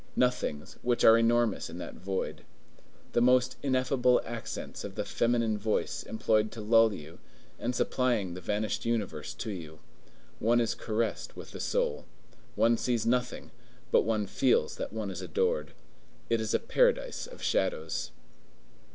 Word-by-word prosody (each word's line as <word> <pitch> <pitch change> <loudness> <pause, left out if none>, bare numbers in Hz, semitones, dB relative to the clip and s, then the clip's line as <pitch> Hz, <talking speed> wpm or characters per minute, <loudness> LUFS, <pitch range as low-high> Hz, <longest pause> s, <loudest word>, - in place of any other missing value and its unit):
Nothings, 125 -12 0
which 120 -1 +1
are 110 - +9
enormous 115 -3 +2
in 85 - -8
that 90 - -6
void. 95 +1 -4 0.7
The 120 - +2
most 125 +1 +4
ineffable 130 -2 +3
accents 115 0 -6
of - - -7
the - - -2
feminine 115 -2 +1
voice 110 +1 -1
employed 110 -1 +1
to 115 - -6
lull 115 +1 +5
you, 80 -3 -9 0.4
and 125 +1 -2
supplying 120 -8 +1
the 90 - -7
vanished 105 +3 -1
universe 115 -4 -2
to 110 - -4
you. 80 -5 -8 0.6
One 120 +2 +3
is 115 - +1
caressed 110 -1 -2
with - - -9
the - - -8
soul. - - -1 0.5
One 115 0 +4
sees 120 -2 0
nothing, 125 +1 -1 0.4
but - - +6
one 110 -2 0
feels 125 +5 +2
that - - -4
one 110 -2 -4
is 95 0 -6
adored. 75 -3 -1 0.6
It 115 -1 +3
is 110 -2 0
a - - +3
paradise - - +1
of - - -12
shadows. 80 -6 0
110 Hz, 150 wpm, -30 LUFS, 100-120 Hz, 0.7 s, are